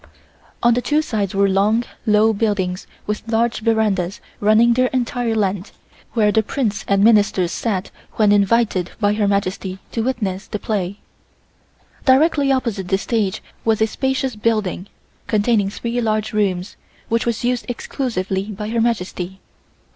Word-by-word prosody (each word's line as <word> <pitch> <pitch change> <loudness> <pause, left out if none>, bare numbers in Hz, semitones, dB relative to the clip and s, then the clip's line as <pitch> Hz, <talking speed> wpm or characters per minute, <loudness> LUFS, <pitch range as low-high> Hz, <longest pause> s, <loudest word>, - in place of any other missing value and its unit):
On 240 0 +5
the 245 - +1
two 300 +4 +1
sides 205 -8 -2
were 200 0 +4
long, 205 +4 +2 0.2
low 215 +1 +4
buildings 200 -4 -1 0.2
with 210 0 -2
large 230 0 +1
verandas 215 -5 0 0.2
running 220 +3 +5
their 255 +1 +3
entire 245 -2 -1
length, 195 -2 -2 0.4
where 210 -3 +3
the 220 - +3
Princes 220 -1 -2
and 200 0 +3
Ministers 205 -5 +4
sat 195 -5 -2 0.2
when 210 -2 +3
invited 205 -2 +2
by 205 -1 +2
Her 210 -1 +1
Majesty 195 -1 -1
to 230 - -1
witness 215 -6 -2
the - - -3
play. 200 -2 -2 1.1
Directly 280 +1 +4
opposite 230 -8 -1
this 195 +1 0
stage 215 -5 -1 0.2
was 225 -2 +2
a 220 - +4
spacious 265 +1 -1
building, 210 -4 -1 0.4
containing 210 -2 +2
three 235 +4 -3
large 215 -1 -1
rooms, 190 -3 -1 0.3
which 230 +1 0
was 235 0 -1
used 245 0 0
exclusively 195 -7 -2
by 210 0 -6
Her 230 0 0
Majesty. 190 -5 -2
215 Hz, 145 wpm, -20 LUFS, 200-235 Hz, 1.1 s, On